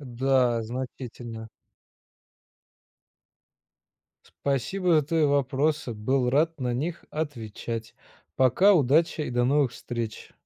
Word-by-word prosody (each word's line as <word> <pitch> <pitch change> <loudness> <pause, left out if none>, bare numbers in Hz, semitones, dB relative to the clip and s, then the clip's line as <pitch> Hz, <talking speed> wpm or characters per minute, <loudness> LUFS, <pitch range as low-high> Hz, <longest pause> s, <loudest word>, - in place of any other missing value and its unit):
Да 125 -2 +1
значительно. 120 -2 -7 2.9
Спасибо 155 +5 +1
твои 160 +2 +1
вопросы! 140 -1 +1
Был 125 +4 0
рад 160 +2 +1
на 125 -1 -1
них 160 +7 -3
отвечать! 115 -6 -5 0.4
Пока, 130 - +5
удачи 155 +1 +3
и 145 - -4
до 120 0 +1
новых 140 -1 +2
встреч! 115 -3 -6
130 Hz, 90 wpm, -26 LUFS, 120-150 Hz, 2.9 s, Пока